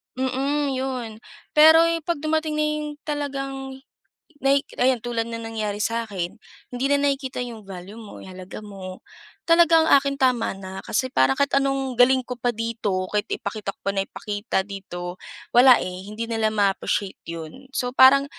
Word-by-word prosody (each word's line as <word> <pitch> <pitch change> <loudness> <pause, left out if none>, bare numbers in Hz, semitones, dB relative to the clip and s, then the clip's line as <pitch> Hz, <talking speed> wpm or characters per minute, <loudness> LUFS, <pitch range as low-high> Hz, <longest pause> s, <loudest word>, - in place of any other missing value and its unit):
Mhm, 275 +3 0
yun. 260 -3 -3 0.4
Pero 320 +2 +8
yung, 335 -1 0
'pag 340 -4 -2
dumating 310 0 0
na 305 - +1
yung 300 0 -1 0.2
talagang 275 -2 -4 0.7
nahi 275 +1 +4 0.2
ayan 255 0 +2
tulad 230 0 -2
ng 230 0 -5
nangyari 215 -2 -3
sa 230 +2 0
akin, 185 -2 -4 0.4
hindi 250 +2 -2
na 285 - +5
nakikita 270 -2 -2
yung 230 -3 -9
value 190 +2 -9
mo, 215 -3 -11
yung 190 - -10
halaga 185 +2 -8
mo. 190 -2 -9 0.5
Talagang 335 -1 +5
akin, 280 -2 +4
tama 250 -6 +1
na. 190 0 -8
Kasi, 255 +3 -2
parang 130 +1 +3
kahit 280 0 +1
anong 275 -1 +1
galing 250 +1 +4
ko 250 - -4
pa 245 0 -1
dito, 225 -5 -2
kahit 210 0 0
ipakita 200 0 -4
ko - - -63
pa 200 - 0
nang 195 - +1
ipakita 205 -2 -2
dito, 180 -3 -7 0.3
wala 250 +1 +8
eh, 180 0 -5
hindi 220 +2 -4
nila 225 -1 0
ma-appreciate 200 -1 -1
yun. 165 - -8
So, 250 -2 -2
parang 270 +2 +7
245 Hz, 170 wpm, -23 LUFS, 205-275 Hz, 0.7 s, Pero